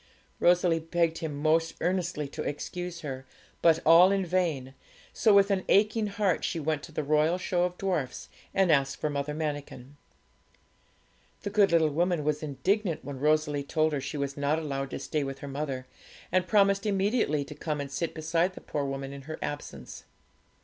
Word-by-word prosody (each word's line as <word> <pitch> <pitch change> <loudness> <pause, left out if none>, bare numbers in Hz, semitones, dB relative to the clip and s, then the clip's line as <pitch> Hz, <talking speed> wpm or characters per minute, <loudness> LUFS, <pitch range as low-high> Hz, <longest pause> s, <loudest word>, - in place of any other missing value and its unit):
Rosalie 175 -1 +4
begged 165 0 0
him 155 -4 -4
most 160 +2 +1
earnestly 175 -5 -1
to 155 - -6
excuse 175 +4 -5
her, 130 -3 -5 0.4
but 165 -2 +5
all 170 +4 +8
in 195 -1 +1
vain; 165 -7 -1 0.4
so 220 - +3
with 200 0 +5
an 190 -1 +1
aching 215 +2 +3
heart 200 -3 0
she 165 - -1
went 155 -1 -1
to 165 - -11
the 155 - -2
Royal 155 +4 +2
Show 180 -1 0
of 180 0 -4
Dwarfs 170 -10 -2 0.2
and 190 -3 +3
asked 135 -2 +2
for 155 - -2
Mother 145 +1 -3
Manikin. 145 -3 -5 1.5
The 205 - -3
good 200 -2 +4
little 160 -2 +4
woman 170 +1 +1
was 150 0 0
indignant 170 +4 -1
when 140 -1 -6
Rosalie 150 0 +2
told 155 +2 0
her 140 - -1
she 150 - -5
was 140 -1 -2
not 145 +2 +1
allowed 135 -3 -3
to - - -5
stay 150 -2 -2
with 135 0 -5
her 140 - -8
mother, 135 -2 -4 0.5
and 185 0 +2
promised 200 -1 +3
immediately 195 - +1
to 150 - -9
come 150 0 -3
and 140 -1 -5
sit 160 +4 -3
beside 165 +3 0
the - - -9
poor 145 - -3
woman 135 0 -4
in 140 - -8
her 155 - -4
absence. 145 0 -7
160 Hz, 185 wpm, -28 LUFS, 145-180 Hz, 1.5 s, all